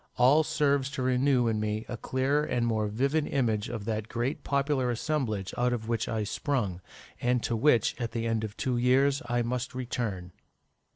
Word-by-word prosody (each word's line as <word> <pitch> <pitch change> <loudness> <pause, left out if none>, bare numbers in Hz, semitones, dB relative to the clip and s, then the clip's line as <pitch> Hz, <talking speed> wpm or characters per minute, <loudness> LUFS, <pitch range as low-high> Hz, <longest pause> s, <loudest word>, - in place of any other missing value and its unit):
All 130 +5 +6
serves 145 -3 +1
to 130 - -1
renew 130 -1 +3
in 110 -1 0
me 110 +1 -2
a 120 - -4
clearer 135 +5 0
and 125 -5 0
more 110 -2 0
vivid 140 +8 0
image 115 -4 0
of 115 -4 -5
that 110 -1 -2
great 120 +5 -2
popular 140 -2 +1
assemblage 115 -6 -2
out 125 0 +2
of 110 -2 -4
which 115 -1 -1
I 110 -1 -1
sprung, 105 - -2 0.4
and 125 -1 +1
to 115 - 0
which, 120 -1 +3
at 115 - -2
the 115 0 -2
end 115 -1 0
of 110 0 -6
two 130 -3 0
years, 135 +3 +3
I 120 0 +1
must 125 +2 -3
return." 115 -8 -3
120 Hz, 185 wpm, -29 LUFS, 110-135 Hz, 0.4 s, All